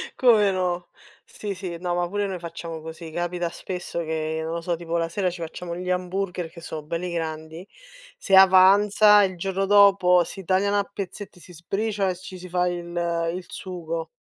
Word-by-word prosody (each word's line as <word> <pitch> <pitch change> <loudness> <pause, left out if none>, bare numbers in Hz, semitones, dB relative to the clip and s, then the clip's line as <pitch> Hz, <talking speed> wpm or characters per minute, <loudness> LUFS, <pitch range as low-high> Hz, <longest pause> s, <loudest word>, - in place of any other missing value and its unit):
Come 215 -6 +5
no? 180 -1 -2 0.3
Sì, 205 -2 -6
sì, 180 -3 -6
no, 175 -1 -2
ma 175 0 -1
pure 205 0 -1
noi 185 -2 -4
facciamo 165 -1 -7
così. 160 +1 -8
Capita 175 +1 -2
spesso 180 -1 -6
che 160 0 -2
non 160 - -4
lo 170 - -3
so, 170 0 -1
tipo 170 0 -3
la 165 0 0
sera 185 +2 -1
ci 175 0 -8
facciamo 170 +1 -6
gli 180 0 -5
hamburger 180 -1 -2
che 170 - -13
sono 160 -2 -7
belli 170 +3 -4
grandi, 160 +1 -5 0.5
se 195 - +2
avanza, 200 +2 +7
il 185 -2 -1
giorno 195 +2 -1
dopo 195 -3 +5
si 195 - -9
tagliano 200 +3 +1
a 200 - +2
pezzetti, 200 -1 -7
si 180 +2 -15
sbriciola 195 +4 -2
e 180 - -2
ci 185 0 -10
si 180 0 -10
fa 180 0 +1
il 175 -1 -3 0.5
il 180 0 -6
sugo. 165 -3 -5
180 Hz, 190 wpm, -24 LUFS, 170-195 Hz, 0.5 s, avanza